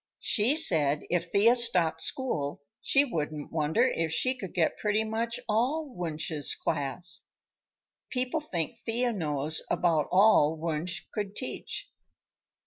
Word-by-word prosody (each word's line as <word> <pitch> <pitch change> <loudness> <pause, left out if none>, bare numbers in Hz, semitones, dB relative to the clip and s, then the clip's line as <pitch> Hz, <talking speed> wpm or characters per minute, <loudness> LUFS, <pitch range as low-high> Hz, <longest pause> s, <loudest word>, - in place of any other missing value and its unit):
She 235 +6 +3
said 150 - +3
if 170 -1 -1
Thea 225 +5 +5
stopped 180 -9 +4
school 145 - -2 0.2
she 280 +1 +3
wouldn't 155 - -4
wonder 160 +8 +1
if 165 -11 0
she 255 +11 +1
could 195 -8 -8
get 165 -3 +1
pretty 210 +1 +1
much 225 +2 -2
all 260 +7 0
Wunsch's 160 -3 0
class. 175 +6 -2 0.9
People 255 +4 -1
think 230 - -4
Thea 240 +1 -1
knows 155 -4 -1
about 160 -4 +1
all 185 -6 +5
Wunsch 165 +2 -3
could 205 -1 -4
teach." 385 - -5
180 Hz, 130 wpm, -28 LUFS, 160-235 Hz, 0.9 s, Thea